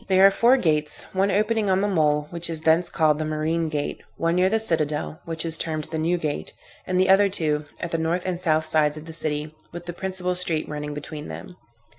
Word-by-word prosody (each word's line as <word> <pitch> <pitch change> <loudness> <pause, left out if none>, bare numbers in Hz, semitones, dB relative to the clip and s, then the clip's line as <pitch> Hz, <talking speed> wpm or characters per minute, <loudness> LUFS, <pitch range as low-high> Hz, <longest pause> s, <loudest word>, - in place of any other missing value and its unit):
There 190 0 +5
are 195 - +8
four 240 +6 +4
gates; 155 - 0
one 195 +1 +2
opening 210 +1 +1
on 190 0 +3
the 205 - +1
mole, 150 -6 +2
which 170 0 -2
is 160 -1 -1
thence 165 +2 +4
called 155 -2 +2
the - - 0
marine 155 +1 -1
gate, 150 -2 -3 0.2
one 165 0 +1
near 180 +1 +3
the 220 +2 +1
citadel, 155 -6 0
which 165 0 -4
is 165 -1 +1
termed 155 -2 -1
the 160 - -2
new 170 +3 +1
gate; 155 -3 -4 0.3
and 185 0 +1
the 185 - +4
other 200 +1 +6
two, 155 -5 -1
at 170 - -4
the 165 - 0
north 165 +3 0
and 180 -2 -2
south 160 -3 +1
sides 155 -1 +2
of 155 - -9
the 165 - -9
city, 150 -1 -2 0.2
with 175 +1 -8
the 175 - -5
principal 185 0 -3
street 170 -3 -1
running 150 -1 -5
between 150 +1 -7
them. 180 - -9
165 Hz, 230 wpm, -24 LUFS, 155-185 Hz, 0.3 s, are